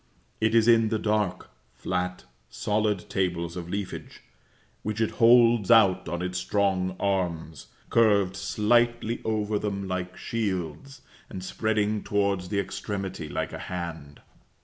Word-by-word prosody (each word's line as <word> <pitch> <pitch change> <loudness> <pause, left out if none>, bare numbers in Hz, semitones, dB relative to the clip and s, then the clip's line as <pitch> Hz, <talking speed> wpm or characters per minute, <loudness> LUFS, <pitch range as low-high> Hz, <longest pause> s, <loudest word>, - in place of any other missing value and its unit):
It 110 +1 +2
is 115 -1 +5
in 115 -2 +5
the 110 - 0
dark, 105 -3 -1 0.2
flat, 90 +5 -3 0.3
solid 105 -2 -1
tables 85 -2 -1
of 85 -1 -6
leafage, 100 0 -5 0.6
which 105 +1 -3
it 110 - +1
holds 115 -3 +6
out 105 -8 +5
on 85 +1 -3
its 90 0 -2
strong 95 -1 0
arms, 90 -5 -2 0.2
curved 100 -5 +3
slightly 120 +3 +1
over 105 -1 0
them 100 -2 -3
like 90 0 -4
shields, 100 - -4 0.3
and 95 - -7
spreading 105 +1 0
towards 100 -3 0
the 100 - 0
extremity 95 -4 -4
like - - -3
a - - -6
hand. 80 -5 -6
100 Hz, 130 wpm, -26 LUFS, 90-110 Hz, 0.6 s, holds